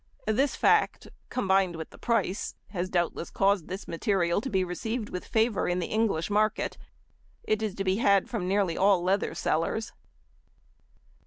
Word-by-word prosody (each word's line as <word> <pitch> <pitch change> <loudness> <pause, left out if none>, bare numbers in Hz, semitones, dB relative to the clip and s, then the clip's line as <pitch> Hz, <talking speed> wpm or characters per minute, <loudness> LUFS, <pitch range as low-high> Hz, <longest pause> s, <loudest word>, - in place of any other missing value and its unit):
This 245 +6 +1
fact, - - +2 0.2
combined 190 -6 +1
with 160 -1 -7
the - - -15
price, 215 -5 -1
has 185 -2 -3
doubtless 175 -2 -1
caused 195 -3 +1
this 190 +2 -6
material 175 0 0
to 265 - -4
be 190 -5 +1
received 215 +5 -3
with 180 - -5
favour 220 -2 +1
in 180 - 0
the 180 - -1
English 210 -6 0
market. 215 +1 +1 0.7
It 215 0 0
is 215 -3 -2
to 195 - -2
be 190 0 +1
had 200 -4 +3
from 205 -7 -3
nearly 195 -3 +1
all 195 -2 +3
leather 195 +3 0
sellers. 165 +7 -1
195 Hz, 160 wpm, -28 LUFS, 180-215 Hz, 0.7 s, had